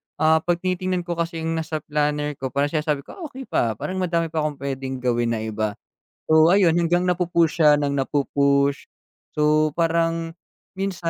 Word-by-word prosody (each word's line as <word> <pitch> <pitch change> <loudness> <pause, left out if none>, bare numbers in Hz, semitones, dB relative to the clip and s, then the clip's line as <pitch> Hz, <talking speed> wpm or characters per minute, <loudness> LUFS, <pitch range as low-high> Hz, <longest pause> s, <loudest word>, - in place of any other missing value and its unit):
ah, 160 0 +3
'pag 175 +2 0
tinitingnan 185 -1 -1
ko 170 -1 -4
kasi 165 -1 -2
yung 165 0 -1
nasa 155 -1 -4
planner 150 0 -1
ko, 130 - -2
parang 140 +2 -1
sinasabi 150 -3 -1
ko, - - -13
"Ah, 370 - -10
okey, 265 -1 -9
pa, 115 - 0
parang 185 - -4
madami 170 -3 0
pa 160 - -1
akong 150 -1 -1
puwedeng 135 -1 -5
gawin 120 -1 +1
na 110 - -4
iba". 110 -1 -2 0.5
So, 160 +3 +6
ayun, 175 -4 +4
hanggang 175 +1 +1
napu-push 170 -2 +1
siya 150 -2 +6
nang 140 -1 -1
napu-push, 140 0 +1 0.5
so, 150 0 +2
parang 165 0 0 0.4
minsan 190 -3 -2
155 Hz, 180 wpm, -23 LUFS, 140-170 Hz, 0.5 s, So